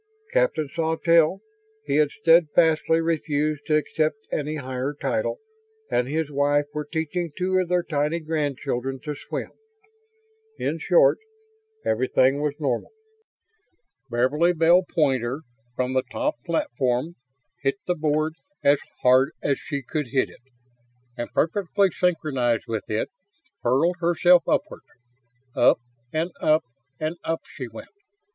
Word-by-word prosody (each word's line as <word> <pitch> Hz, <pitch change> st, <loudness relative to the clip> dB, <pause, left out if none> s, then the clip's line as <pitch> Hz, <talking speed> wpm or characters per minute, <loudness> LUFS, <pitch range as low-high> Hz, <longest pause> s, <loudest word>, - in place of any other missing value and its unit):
Captain -, -, +2 dB
Sawtelle 165 Hz, +3 st, +2 dB, 0.4 s
he 140 Hz, 0 st, 0 dB
had 150 Hz, -1 st, +4 dB
steadfastly 165 Hz, -2 st, +3 dB
refused 155 Hz, -2 st, -1 dB
to 155 Hz, -, +3 dB
accept 155 Hz, +3 st, 0 dB
any 150 Hz, +1 st, -2 dB
higher 130 Hz, 0 st, -3 dB
title -, -, -1 dB, 0.5 s
and 125 Hz, -, +1 dB
his 155 Hz, +1 st, -2 dB
wife 145 Hz, +1 st, +2 dB
were 150 Hz, -1 st, -4 dB
teaching 165 Hz, +1 st, -2 dB
two 185 Hz, 0 st, +1 dB
of 185 Hz, -, 0 dB
their 180 Hz, -1 st, +2 dB
tiny 150 Hz, +1 st, 0 dB
grandchildren 140 Hz, -4 st, -2 dB
to 150 Hz, -, -4 dB
swim. 145 Hz, -, -6 dB, 1.1 s
In -, -, -2 dB
short, -, -, +4 dB, 0.7 s
everything 130 Hz, +4 st, +2 dB
was 150 Hz, -1 st, -1 dB
normal. 130 Hz, -6 st, -1 dB, 1.2 s
Beverly 145 Hz, +9 st, +2 dB
Bell 170 Hz, +2 st, +5 dB
Poynter, 135 Hz, -4 st, +1 dB, 0.3 s
from 125 Hz, +1 st, -1 dB
the 130 Hz, -, +3 dB
top 300 Hz, +1 st, -2 dB
platform, 130 Hz, -2 st, 0 dB, 0.5 s
hit 135 Hz, -1 st, +1 dB
the 180 Hz, -, +1 dB
board 155 Hz, -1 st, 0 dB, 0.3 s
as 140 Hz, 0 st, +5 dB, 0.2 s
hard 130 Hz, +2 st, +5 dB
as 140 Hz, -2 st, +1 dB
she 140 Hz, -3 st, -4 dB
could 150 Hz, +2 st, -3 dB
hit 130 Hz, +2 st, 0 dB
it; -, -, -18 dB, 0.7 s
and, 120 Hz, -, -5 dB
perfectly 195 Hz, +3 st, +1 dB
synchronized 135 Hz, -11 st, 0 dB
with 110 Hz, -3 st, -4 dB
it, 105 Hz, -, -1 dB, 0.5 s
hurled 160 Hz, +9 st, +2 dB
herself 175 Hz, 0 st, +4 dB
upward. -, -, 0 dB, 0.7 s
Up -, -, +5 dB, 0.3 s
and 165 Hz, +3 st, -1 dB
up 155 Hz, +1 st, +3 dB, 0.4 s
and 155 Hz, +2 st, -2 dB
up 165 Hz, 0 st, -2 dB
she 130 Hz, -4 st, -7 dB
went. 115 Hz, -1 st, -11 dB
155 Hz, 125 wpm, -24 LUFS, 135-165 Hz, 1.2 s, Bell